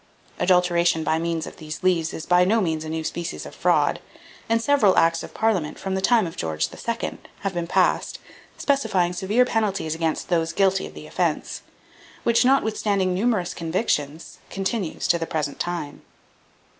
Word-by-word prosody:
Adulteration 175 -2 +3
by 160 +1 +1
means 165 -1 -2
of - - -10
these 155 +2 -8
leaves 170 -3 +2
is 160 - -6
by 180 0 +4
no 215 +5 +3
means 160 -5 -1
a 155 - -6
new 160 0 -3
species 170 +2 -4
of - - -9
fraud; - - +2 0.5
and 230 0 +3
several 230 -6 +3
acts 165 0 +3
of - - -8
parliament, 200 -9 0
from 190 - -4
the 190 - -1
time 225 0 +4
of 165 - -6
George 80 -1 -2
II., 230 0 -4 0.2
have 195 -1 -2
been 175 -1 -3
passed, - - +1 0.4
specifying 210 -11 +1
severe 205 +7 +2
penalties 205 -9 -1
against 160 -1 -2
those 165 -2 +1
guilty 195 -1 +2
of - - -14
the - - -9
offence, - - -2 0.6
which, 235 -1 +3
notwithstanding 215 -7 +2
numerous 200 -2 0
convictions, 160 -3 -2
continues 195 -2 -2
to 170 - +3
the 165 - -3
present 150 -3 -3
time. 170 -5 -4
180 Hz, 170 wpm, -23 LUFS, 165-205 Hz, 0.6 s, by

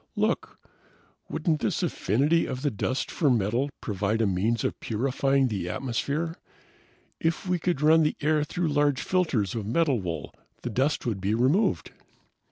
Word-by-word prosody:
"Look - - -1 0.7
wouldn't 155 -1 0
this - - 0
affinity 145 - +1
of 130 +2 -5
the 145 - +1
dust 130 +5 -2
for 150 - +2
metal 120 +4 +1
provide 105 +1 -1
a 115 - +3
means 105 +4 0
of - - -2
purifying 135 +3 +1
the 100 -6 -3
atmosphere? 140 - -2 0.8
If 165 +3 -1
we 180 -1 +1
could 170 -3 -1
run 160 +1 +6
the 150 - +1
air 150 0 +2
through 170 +2 -2
large 145 -2 +2
filters 145 - +1
of 110 -3 -4
metal 135 -1 +2
wool, 85 -3 -5 0.3
the 120 - -3
dust 135 +7 0
would 110 -6 -2
be 100 +3 +1
removed!" 135 - +2
135 Hz, 160 wpm, -27 LUFS, 110-155 Hz, 0.8 s, run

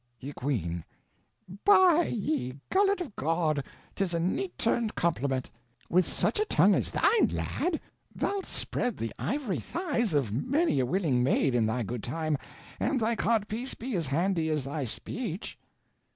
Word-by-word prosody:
Ye 140 +3 -7
Queene. 85 - -2 0.8
By 370 -4 +6
ye 140 - -2 0.2
gullet 395 0 +3
of 275 - -6
God, 155 -1 0 0.3
'tis 185 -4 -1
a - - +1
neat 195 - -1
turned 230 -1 0
compliment. 140 -6 0 0.4
With 180 +1 +4
such - - +1
a 425 - +2
tongue - - +4
as - - +1
thine, 460 - +4
lad, 345 -3 -1 0.4
thou'lt 400 -2 -1
spread 245 -4 0
the 115 0 -3
ivory 260 -5 -1
thighs 240 - -1
of 135 -8 +1
many 275 - +1
a 125 - +1
willing 150 -6 +1
maide 130 +1 +2
in 115 -3 +2
thy 120 +2 -1
good 120 +2 -4
time, 155 +5 -1 0.4
an' 285 - +1
thy 230 -1 +1
cod 220 -2 +1
piece 240 +5 -4
be 245 0 -4
as 165 -5 -1
handy 165 +3 +1
as 155 -3 0
thy 140 +1 -3
speeche. 195 - -5
175 Hz, 160 wpm, -29 LUFS, -, 0.8 s, By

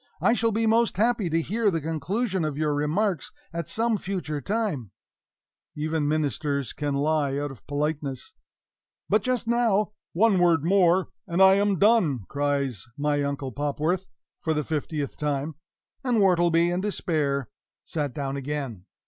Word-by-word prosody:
"I 235 - +4
shall 230 -1 +1
be 225 +1 +1
most 225 -2 +2
happy 220 -3 +2
to 165 +1 +1
hear 215 +4 +1
the 165 -4 0
conclusion 180 - -1
of 150 -2 -2
your 150 -1 +1
remarks 160 +4 0 0.2
at 170 -2 -4
some 230 0 +1
future 175 -7 -3
time" 195 - -2 0.9
(even 155 0 -1
ministers 145 -3 -1
can 145 -2 -2
lie 145 -1 +1
out 145 0 -2
of 135 - -14
politeness); 145 -2 -3 0.8
"but 215 +1 +4
just 250 -1 -1
now 230 -3 +2
" - - -68
"One 200 +1 +4
word 170 -4 +4
more, 185 0 +4 0.2
and 170 0 -1
I 190 0 +8
am 200 0 +2
done," 190 - +3
cries 140 -7 -1
my 145 0 +1
Uncle 140 -2 -2
Popworth, 150 - -1 0.3
for 160 -1 -1
the 150 - 0
fiftieth 150 -1 -3
time; 150 +1 -1 0.5
and 250 -3 +1
Wortleby, 175 -3 +4
in 180 +1 0
despair, 150 - -1 0.4
sat 145 -4 -2
down 140 0 -3
again. 135 -9 -4
160 Hz, 155 wpm, -26 LUFS, 145-195 Hz, 0.9 s, I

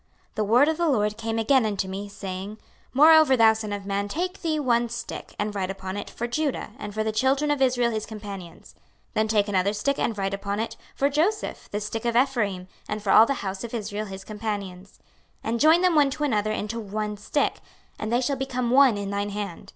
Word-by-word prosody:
26:037:015 - - -39
The 215 - 0
word 245 +7 +5
of 320 0 +1
the 340 -2 +1
LORD 210 -5 +1
came 225 0 -3
again 250 +3 +3
unto 205 -3 -1
me, 195 +2 -5
saying, 195 0 -6
26:037:016 - - -25 0.4
Moreover, 310 -2 +7
thou 225 -1 +6
son 220 -1 -5
of 200 -1 -4
man, 200 0 -1
take 360 - -3
thee 315 -3 0
one 240 -4 +1
stick, 235 +1 -7
and 210 0 -2
write 190 -2 -2
upon 190 0 -5
it, 205 - -5
For 240 - -4
Judah, 275 0 -2
and 205 - -6
for 215 +1 -2
the 220 - -1
children 270 +6 +2
of 290 -2 0
Israel 245 -2 +3
his 215 -1 -3
companions: 200 -5 -9 0.4
then 220 0 +1
take 215 -1 +2
another 200 0 +1
stick, 280 +7 -1
and 225 - -1
write 195 0 -1
upon 200 +1 -3
it, 225 - -3 0.2
For 275 - +2
Joseph, 330 +10 -1
the 205 - -2
stick 215 +2 -4
of 235 -1 0
Ephraim 225 -8 +1 0.2
and 210 0 -3
for 195 - +1
all 225 - +8
the 275 -6 -2
house 190 0 -4
of 235 0 -5
Israel 210 -1 -4
his 195 0 -8
companions: 200 -3 -6 0.5
26:037:017 - - -1
And 235 - -1
join 315 +5 +6
them 365 -1 +3
one 295 -3 +4
to 295 +2 -4
another 215 -6 +1
into 215 +2 -3
one 210 0 -3
stick; 210 +8 -1 0.4
and 215 - -3
they 240 +1 +2
shall 275 +2 0
become 255 -2 -2
one 260 -4 +6
in 200 0 -4
thine 200 0 -1
hand. 200 -4 -6
220 Hz, 230 wpm, -25 LUFS, 205-260 Hz, 0.5 s, all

